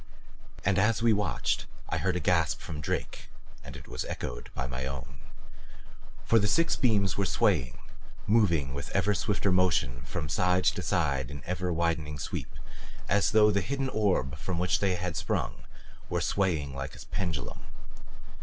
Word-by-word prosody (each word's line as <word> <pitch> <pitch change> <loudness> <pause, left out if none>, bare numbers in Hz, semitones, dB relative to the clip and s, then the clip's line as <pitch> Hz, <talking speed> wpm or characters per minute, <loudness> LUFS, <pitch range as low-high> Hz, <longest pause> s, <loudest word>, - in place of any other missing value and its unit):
And 95 0 +3
as 110 +3 +2
we 115 -1 +5
watched 105 0 0 0.2
I 80 - -1
heard 90 +3 0
a - - 0
gasp 85 -5 +2
from 75 -2 -6
Drake. - - -3 0.3
And - - -9
it - - -12
was - - -4
echoed - - -5
by 65 - -2
my 65 +1 -4
own. 70 0 -7 1.1
For 115 - +5
the 105 - +2
six 165 +9 +3
beams 105 -6 +2
were 100 - +2
swaying, 75 - +1 0.5
moving 85 -11 +3
with 70 0 -5
ever 105 - +3
swifter 100 -1 0
motion 85 -10 +2
from 75 +6 -4
side 90 +5 +2
to 95 - +2
side 70 -7 0
in 70 -2 -8
ever 90 0 -2
widening 80 -3 0
sweep, 70 - -4 0.6
as 100 +2 +3
though 105 -1 +5
the 100 0 +1
hidden 135 +5 -2
orb 90 - 0
from 90 +2 -3
which 90 +1 +2
they 95 -2 +1 0.2
sprang - - -2 0.4
were - - 0
swaying 80 -8 0
like 70 0 -5
a - - -10
pendulum. 85 -9 -3
90 Hz, 165 wpm, -29 LUFS, 70-100 Hz, 1.1 s, we